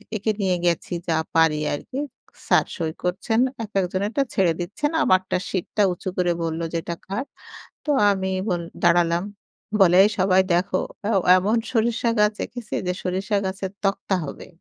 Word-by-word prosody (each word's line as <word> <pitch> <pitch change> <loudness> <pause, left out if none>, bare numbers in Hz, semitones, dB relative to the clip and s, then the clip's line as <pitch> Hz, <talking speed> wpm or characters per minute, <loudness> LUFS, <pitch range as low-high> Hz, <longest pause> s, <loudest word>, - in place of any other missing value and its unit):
এঁকে 215 +1 0
নিয়ে 185 -2 +2
গেছি 170 0 0
যা 165 - +2 0.2
পারি 160 -2 +4 0.2
আরকি। 255 - -6 0.5
স্যার - - +4
সই 160 -4 -2
করছেন, 190 +6 0 0.2
এক, 215 - -8
একজনেরটা 200 +8 -1
ছেড়ে 180 -4 +3
দিচ্ছেন। 205 - -2
আমারটা 185 0 +2
সিটটা 195 +2 -1
উঁচু 185 +2 -5
করে 180 -1 +2
বলল 165 0 -2 0.2
এটা 170 +1 -5
কার। 200 +8 -3 0.6
তো - - -5 0.2
আমি 190 -1 -1 0.6
দাঁড়ালাম। 170 0 +3 0.6
বলে 180 -1 +6
এই - - +3
সবাই 185 0 +4
দেখো, 180 +1 +1 0.6
এমন 205 +5 +1
সরিষা 235 0 +1
গাছ 210 0 +4
এঁকেছে 235 -3 -7
যে 180 - +1
সরিষা 190 +3 -1
গাছের 190 0 -3
তক্তা 195 0 0
হবে। 140 - -8
190 Hz, 150 wpm, -23 LUFS, 175-210 Hz, 0.6 s, বলে